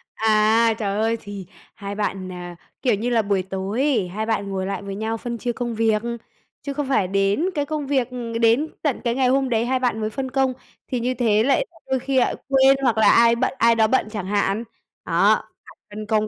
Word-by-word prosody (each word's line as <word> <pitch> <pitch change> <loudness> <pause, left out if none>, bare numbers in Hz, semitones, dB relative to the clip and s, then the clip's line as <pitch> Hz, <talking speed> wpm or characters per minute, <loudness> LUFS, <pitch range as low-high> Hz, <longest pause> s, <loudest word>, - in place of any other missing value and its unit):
À, 220 +1 +3
trời 200 -2 -2
ơi 225 +1 +1
thì 200 -3 -8 0.3
hai 200 0 -6
bạn, 195 -3 -3
ờ, 175 -1 -8 0.3
kiểu 245 -6 +2
như 230 +5 -2
là 230 -2 +3
buổi 200 -2 0
tối 190 +4 -4
ấy, 255 -10 +1
hai 210 +5 -4
bạn 210 -3 -1
ngồi 190 -1 -3
lại 195 +1 -3
với 200 -1 -6
nhau 220 +2 -2
phân 235 +1 -5
chia 240 +1 -2
công 240 0 -4
việc. 220 -1 +2 0.6
Chứ 285 -1 -5
không 280 -1 -3
phải 205 -9 +2
đến 195 - +1
cái 290 -1 0
công 300 -1 -4
việc 265 -3 0
ừm, 240 -2 -6
đến 235 +7 +3
tận 290 -5 -1
cái 235 -1 0
ngày 260 -1 +2
hôm 265 0 +2
đấy 230 0 +1
hai 260 +1 0
bạn 245 -3 0
mới 215 - -1
phân 260 +3 -5
công, 265 -1 +1 0.3
thì 250 - -2
như 250 +2 -1
thế 220 -3 +2
lại 280 - +2 0.2
đôi 265 -1 +1
khi 265 +1 +1
lại - - +1
quên, 270 0 +5
hoặc 235 -4 +2
là 220 - +5
ai 235 0 +5
bận - - 0
ai 230 -1 +4
đó 220 -1 +4
bận 260 -1 +1
chẳng 205 -4 -4
hạn. 205 +2 0 0.4
Đó, - - +4 0.3
phải - - -17
phân 210 +1 -7
công 215 0 +1
225 Hz, 230 wpm, -22 LUFS, 205-255 Hz, 0.6 s, quên